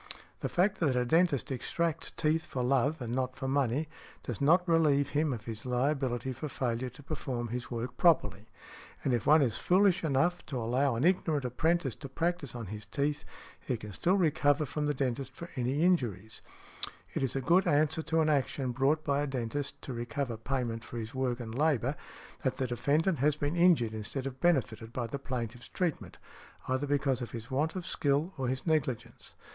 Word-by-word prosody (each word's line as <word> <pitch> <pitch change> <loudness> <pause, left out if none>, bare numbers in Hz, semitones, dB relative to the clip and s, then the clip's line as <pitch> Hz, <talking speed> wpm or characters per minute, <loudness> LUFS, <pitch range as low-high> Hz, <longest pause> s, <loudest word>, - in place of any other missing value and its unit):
The - - -2
fact 190 +3 +2
that 145 -6 +2
a 125 0 +2
dentist 160 -3 +2
extracts 165 +5 -1
teeth 155 +1 0
for 125 - -2
love 135 +3 +1
and 120 0 -4
not 130 0 -1
for 135 - -4
money 140 +2 +1 0.4
does - - -5
not 175 +6 +4
relieve 150 -4 +3
him 150 +1 +1
of 115 -4 -4
his 115 -1 -6
liability 130 0 0
for 150 +5 -5
failure 125 -1 -2
to 125 +4 -14
perform 130 -5 -3
his 120 +1 -4
work 120 +1 -4
properly; 110 - +3 0.6
and 130 - +1
if 120 - 0
one 155 0 +7
is 115 -5 0
foolish 190 0 +3
enough 165 +4 +2
|167| - - -30
to 135 - -3
allow 125 +3 +1
an 115 - -1
ignorant 160 -5 +2
apprentice 155 +2 +1
to 140 - -8
practise 165 -2 -2
on 115 -2 -5
his 105 0 -8
teeth, 145 +1 -1 0.3
he 125 - -2
can 105 -1 -8
still 175 - +2
recover 150 -3 +3
from 150 +2 -2
the 145 - 0
dentist 130 0 -2
for 170 - -8
any 130 +4 0
injuries. 110 - 0 0.7
It - - -1
is 135 -2 -1
a - - +1
good 175 +7 +4
answer 155 0 +3
to 160 0 +1
an 155 - +2
action 135 -2 0
brought 140 +5 +2
by 140 -1 +1
a 145 - -1
dentist 135 +2 -3
to 130 - -5
recover 120 +1 -3
payment 115 -1 -2
for 120 - -8
his 115 0 -5
work 130 -2 -1
and 110 -2 -6
labor, 140 -1 +1 0.5
that 130 - -1
the 130 - 0
defendant 145 +7 +1
has 145 +2 +3
been 145 +2 -1
injured 170 -11 +4
instead 110 +5 -4
of 135 -1 -5
benefited 120 -9 +1
by 125 - -2
the 125 +5 -5
plaintiff's 120 -3 -5
treatment, 175 -4 -3 0.5
either 130 +3 0
because 135 -2 +1
of 120 - -6
his 115 +1 -7
want 150 +6 0
of 185 -2 -4
skill 145 +6 0
or 130 - 0
his 130 +1 -2
negligence. 150 -8 -2
135 Hz, 195 wpm, -31 LUFS, 125-155 Hz, 0.7 s, one